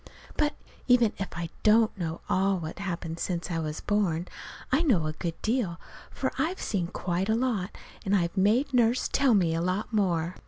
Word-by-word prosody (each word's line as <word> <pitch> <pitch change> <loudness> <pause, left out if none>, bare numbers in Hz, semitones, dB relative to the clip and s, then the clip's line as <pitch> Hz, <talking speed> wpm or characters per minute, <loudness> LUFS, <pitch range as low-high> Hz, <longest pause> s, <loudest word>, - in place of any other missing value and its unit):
But 300 -1 +1 0.3
even 245 -4 +5
if 195 - -2
I 170 -1 -4
don't 220 +1 +4
know 170 -4 -4
all 195 +1 +2
of 175 - -4
what's 160 - -6
happened 170 -3 -4
since 175 0 -2
I 165 - -1
was 155 -1 -4
born, 185 -5 0 0.4
I 270 +5 +4
know 225 - +3
a 155 - -2
good 165 +1 -4
deal, 220 -8 0 0.3
for - - -2
I've 350 +4 0
seen 185 -5 -1
quite 180 +2 -2
a 220 - +3
lot, 230 -6 -1 0.3
and 200 -1 +2
I've 170 -2 0
made 230 +9 +2
Nurse 240 0 +3
tell 270 -5 +3
me 175 -5 +3
a 165 - 0
lot 185 +6 -2
more. 175 -4 +1
195 Hz, 195 wpm, -28 LUFS, 170-225 Hz, 0.4 s, even